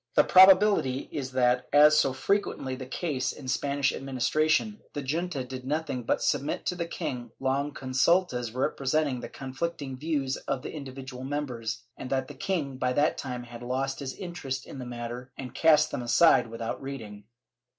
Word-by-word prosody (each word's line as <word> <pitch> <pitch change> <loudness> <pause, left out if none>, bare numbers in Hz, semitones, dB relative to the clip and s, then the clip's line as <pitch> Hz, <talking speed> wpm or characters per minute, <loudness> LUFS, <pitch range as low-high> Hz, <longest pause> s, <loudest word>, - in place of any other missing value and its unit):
The - - +7
probability 185 -8 +6
is 130 -3 -4
that, 125 -1 +2
as 150 +1 +7
so 135 - +3
frequently 135 -2 -1
the 130 -1 -8
case 135 -2 -2
in 130 - -10
Spanish 140 +1 +1
admin 135 -1 -6
istration, 155 - +2 0.2
the 145 - -4
junta 155 0 -2
did 130 0 -7
nothing 145 -2 -2
but 115 - 0
submit 145 +1 0
to 180 - 0
the 170 -1 -3
king 125 -9 -4
long 135 +2 0
consultas 130 -1 +1
representing 135 +2 0
the - - -7
conflicting 135 +1 -4
views 140 -2 -1
of 130 - -3
the - - -6
individual 135 -3 -7
members, 125 -5 -3
and 130 - -7
that 130 -1 0
the - - -7
king 145 -2 -2
by 125 -1 0
that 145 +4 +2
time 125 -2 -4
had 120 0 -10
lost 135 +2 -2
his 135 -2 -5
interest 140 -8 -5
in 135 - -9
the 125 - -6
matter 120 +1 -6
and 125 -3 -7
cast 155 -1 +4
them - - -3
aside 120 +3 +5
without 115 0 -5
reading. 110 -7 -7
135 Hz, 175 wpm, -28 LUFS, 125-150 Hz, 0.2 s, The